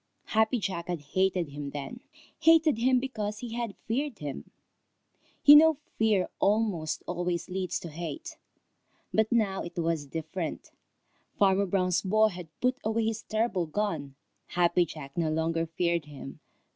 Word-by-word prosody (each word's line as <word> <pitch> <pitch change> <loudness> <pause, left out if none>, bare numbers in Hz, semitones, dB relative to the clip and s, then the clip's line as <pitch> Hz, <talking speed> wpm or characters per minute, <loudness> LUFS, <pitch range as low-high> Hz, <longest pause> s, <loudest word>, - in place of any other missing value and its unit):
Happy 220 +3 +3
Jack 185 -5 -3
had 175 -2 -2
hated 185 -4 +1
him 145 0 -6
then, 145 - -6 0.4
hated 320 -4 +5
him 255 +1 +4
because 215 -5 -3
he 230 +1 -6
had 235 -3 -3
feared 265 +1 -1
him. 145 -2 -6 1.0
You 290 - +11
know 315 0 +7 0.2
fear 215 -4 +3
almost 200 -7 +1
always 175 -1 -2
leads 185 -1 -2
to 170 - -7
hate. 160 -1 -6 0.8
But 220 0 +2
now 210 -5 +1
it 170 - -8
was 165 -3 -1
different. 160 +3 -5 0.7
Farmer 195 0 +3
Brown's 185 -1 +1
boy 215 +3 +3
had 180 -3 -8
put 255 +1 +1
away 220 +1 0
his 225 0 -1
terrible 215 -6 -1
gun. 155 -7 -2 0.3
Happy 175 0 +2
Jack 140 -3 -9
no 165 -2 +1
longer 165 +1 0
feared 170 -1 0
him. 140 0 -10
190 Hz, 145 wpm, -29 LUFS, 165-220 Hz, 1.0 s, You